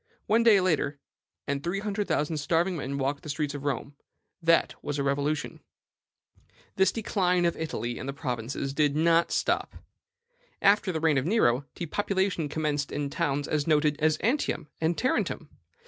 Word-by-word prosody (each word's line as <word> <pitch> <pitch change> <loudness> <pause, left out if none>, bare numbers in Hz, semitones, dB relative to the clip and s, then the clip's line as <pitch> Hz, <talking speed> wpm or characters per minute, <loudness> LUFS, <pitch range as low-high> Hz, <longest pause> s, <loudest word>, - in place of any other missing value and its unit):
One 225 +2 +3
day 225 -4 +6
later, 155 -5 0 0.5
and 140 0 -2
three 175 +3 -1
hundred 205 0 -2
thousand 150 +2 0
starving 165 +5 +1
men 140 -3 -3
walked 140 +1 -1
the 155 - -9
streets 150 0 -2
of 145 0 -6
Rome: 140 +1 -2 0.5
that 165 0 +3
was 145 0 -3
a 140 - 0
revolution. 140 +2 -1 1.2
"This 190 -1 +4
decline 180 -5 +1
of 170 - +1
Italy 120 -7 -4
and 130 - -5
the - - 0
provinces 135 0 -3
did 145 -1 +2
not 165 +2 +3
stop. - - 0 0.8
After 200 -1 +4
the 160 - -2
reign 155 -3 +3
of 135 - -3
Nero, 140 - +2
depopulation 190 -2 -1
commenced 150 -2 -1
in 145 -1 -3
towns 145 0 -1
as 150 -1 -1
noted 150 -1 +3
as 155 0 +2
Antium 230 - 0
and 165 +1 +1
Tarentum. 255 - -1
155 Hz, 165 wpm, -28 LUFS, 140-180 Hz, 1.2 s, day